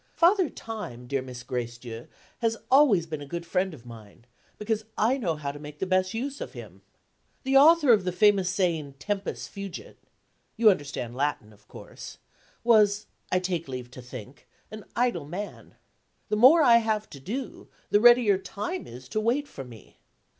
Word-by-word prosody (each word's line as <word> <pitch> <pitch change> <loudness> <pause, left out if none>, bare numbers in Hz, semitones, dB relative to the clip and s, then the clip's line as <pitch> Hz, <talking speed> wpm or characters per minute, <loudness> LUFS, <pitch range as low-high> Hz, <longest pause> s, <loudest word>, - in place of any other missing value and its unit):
Father 355 0 +4
Time, 210 - -8
dear 135 +1 -2
Miss 125 -2 -9
Gracedieu, 120 -2 -6 0.3
has 225 -1 0
always 260 - +5
been 155 -2 -6
a 145 - -8
good 170 +2 -5
friend 185 +2 0
of 130 -7 -13
mine, 115 -1 -13 0.3
because 215 0 -2
I 230 +5 +3
know 175 -9 -1
how 145 -2 -4
to 145 - -11
make 150 0 -10
the 190 - -2
best 185 +2 +1
use 275 +4 -4
of - - -6
him. - - -11 0.6
The 265 0 0
author 300 -2 +7
of 205 -4 +3
the 180 - -1
famous 195 0 +3
saying 165 -7 -1
Tempus 200 +6 -4
fugit 200 -3 -8 0.6
(you 220 -2 +7
understand 140 -8 -4
Latin, 130 -6 -2
of 105 0 -24
course) - - -11 0.5
was, 210 -3 +4 0.3
I 185 - +3
take 180 -3 -2
leave 125 -2 -7
to 130 - -10
think, 125 +1 -11 0.2
an 215 -1 -9
idle 240 -11 0
man. 195 +6 -7 0.5
The - - +1
more 270 +9 +7
I 235 -4 +7
have 220 -2 -1
to 140 - -10
do, 235 - -6 0.2
the 205 - +4
readier 240 -5 +6
Time 200 -3 -5
is 125 +2 -11
to 215 - -1
wait 255 +6 0
for 135 - -8
me. 115 -5 -15
185 Hz, 175 wpm, -27 LUFS, 135-225 Hz, 0.6 s, author